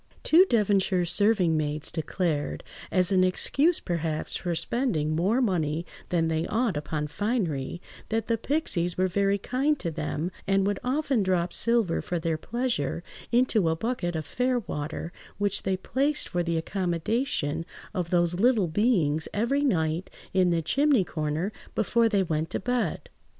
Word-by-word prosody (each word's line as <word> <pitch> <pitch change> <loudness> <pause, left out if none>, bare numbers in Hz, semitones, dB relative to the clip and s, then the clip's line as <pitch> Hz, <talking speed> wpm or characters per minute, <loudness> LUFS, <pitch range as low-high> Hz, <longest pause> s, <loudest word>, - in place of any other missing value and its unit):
Two 345 +4 +6
Devonshire 195 -5 +2
serving–maids 165 -7 +1
declared, 160 -2 -2 0.3
as 185 0 +2
an 185 -1 +4
excuse 280 - +2
perhaps 165 -3 -3
for 175 -2 -2
spending 160 - 0
more 205 +10 +2
money 165 -6 0 0.2
than 165 -2 +1
they 160 0 -1
ought 225 -4 0
upon 150 +1 -2
finery, 170 - -2 0.3
that 225 0 0
the 230 - +2
pixies 205 - -1
were 185 0 +3
very 200 +2 +1
kind 270 +8 0
to 170 -10 -3
them, 155 +2 -3 0.2
and 195 0 +3
would 205 -1 0
often 270 -2 +1
drop 180 -2 0
silver 230 -7 +2
for 180 - -3
their 165 -1 -1
pleasure 195 - -2 0.3
into 235 -7 +3
a 160 - +1
bucket 175 -3 -2
of 155 -1 -3
fair 250 0 0
water, 155 -1 -5 0.2
which 205 -1 0
they 190 -1 0
placed 280 +9 0
for 175 - 0
the 170 -1 -1
accommodation 170 - -1 0.3
of 175 -2 -2
those 175 0 +1
little 225 -4 +4
beings 160 -5 +1
every 250 +7 +1
night 165 - 0 0.2
in 185 -1 +4
the 170 -1 +1
chimney–corner 185 - +1 0.2
before 230 +2 +2
they 200 -3 +2
went 160 -2 -1
to - - -2
bed. 240 -6 -1
185 Hz, 150 wpm, -27 LUFS, 165-230 Hz, 0.3 s, Two